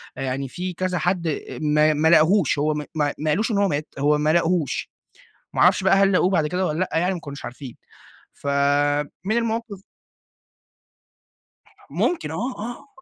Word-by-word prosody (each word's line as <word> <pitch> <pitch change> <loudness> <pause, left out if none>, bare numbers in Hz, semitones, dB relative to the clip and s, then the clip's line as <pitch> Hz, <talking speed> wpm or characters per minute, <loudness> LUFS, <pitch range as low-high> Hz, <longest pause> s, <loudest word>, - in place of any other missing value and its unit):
يعني 135 +1 -3
في 180 +3 -5
كذا 185 +1 -2
حد 175 0 0
أ 155 - -4
ما 150 0 +3
ما 155 +2 +1
لاقهوش، 160 -1 +4
هو 155 +1 +1 0.2
ما 150 -2 0
ما 155 +1 -1
قالوش 220 +9 0
إن 210 - 0
هو 200 0 +3
مات، 150 -2 -2
هو 150 +1 +3
ما 150 +1 +1
لاقهوش، 170 -3 0 0.6
ما - - -1
أعرفش - - +4
بقى 190 +1 +5
هل 195 0 +4
لاقوه 185 0 +3
بعد 160 -5 +2
كده 180 +3 -1
والّا 155 +3 -2
لأ، 185 - -1
يعني 180 +3 +1
ما 175 - -6
كانوش 140 -2 -9
عارفين. 125 0 -9 0.6
ف - - -12 0.8
من 215 +3 0
المواقف 225 -3 -3 2.1
ممكن 335 - -1
آه، 160 - -4 0.2
آه، 240 - -7
170 Hz, 170 wpm, -23 LUFS, 150-190 Hz, 2.1 s, بقى